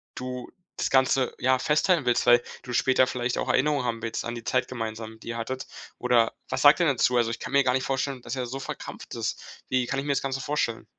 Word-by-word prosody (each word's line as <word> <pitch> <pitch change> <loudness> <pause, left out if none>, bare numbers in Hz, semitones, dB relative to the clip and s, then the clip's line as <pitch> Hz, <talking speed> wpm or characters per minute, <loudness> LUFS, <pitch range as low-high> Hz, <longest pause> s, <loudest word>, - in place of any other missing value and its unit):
du 125 0 -6 0.3
das - - -1
Ganze, 130 -1 +2
ja, 130 0 +2
festhalten 150 +3 +2
willst, 120 - +2
weil 120 0 +6 0.2
du 125 -1 -6
später 130 0 +4
vielleicht 125 -1 -2
auch - - -2
Erinnerungen 145 -2 +2
haben 115 -1 -2
willst 115 0 -3
an 120 - -3
die 120 -1 -7
Zeit 125 +2 0
gemeinsam, 110 -2 -6
die - - -14
ihr 115 0 -3
hattet, 130 +3 -4 0.3
oder 120 -2 +3 0.2
was - - -1
sagt 145 +3 +8
er 170 - +3
denn 140 - +2
dazu? 125 +1 +3
Also, 120 -1 +2
ich 115 - -3
kann - - -7
mir 140 0 +5
gar 125 -1 +2
nicht 130 0 0
vorstellen, 135 -1 -2
dass 125 - -4
er 125 -2 -3
so 135 +3 -5
verkrampft - - -7
ist. - - -5
Wie 130 -1 +1
kann 135 +3 -2
ich 135 - -4
mir 145 - 0
das 135 - 0
Ganze 135 0 -2
vorstellen? 130 -5 -1
125 Hz, 250 wpm, -26 LUFS, 120-135 Hz, 0.3 s, sagt